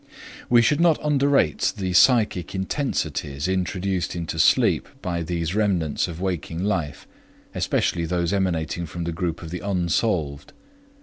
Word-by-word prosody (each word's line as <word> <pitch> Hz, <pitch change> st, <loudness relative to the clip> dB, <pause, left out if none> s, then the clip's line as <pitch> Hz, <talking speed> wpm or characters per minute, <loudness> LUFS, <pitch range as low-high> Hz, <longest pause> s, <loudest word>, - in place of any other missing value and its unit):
We 120 Hz, -1 st, +6 dB
should 145 Hz, +6 st, +2 dB
not 170 Hz, -3 st, +4 dB
underrate 140 Hz, -, +2 dB
the 95 Hz, -2 st, -2 dB
psychic 100 Hz, -3 st, +3 dB
intensities 80 Hz, -, -2 dB
introduced 95 Hz, -1 st, -1 dB
into 80 Hz, -1 st, -4 dB
sleep -, -, +3 dB
by 85 Hz, -2 st, -2 dB
these 85 Hz, 0 st, -2 dB
remnants 95 Hz, -9 st, 0 dB
of 85 Hz, -1 st, -7 dB
waking 90 Hz, -2 st, -3 dB
life, 90 Hz, -8 st, -2 dB, 0.5 s
especially 85 Hz, -1 st, 0 dB
those 85 Hz, +1 st, 0 dB
emanating 85 Hz, -3 st, -1 dB
from 85 Hz, +2 st, -5 dB
the 85 Hz, -, -2 dB
group 85 Hz, 0 st, -3 dB
of 80 Hz, -, -8 dB
the 90 Hz, -, -4 dB
unsolved. 85 Hz, -6 st, -1 dB
90 Hz, 135 wpm, -23 LUFS, 80-100 Hz, 0.5 s, We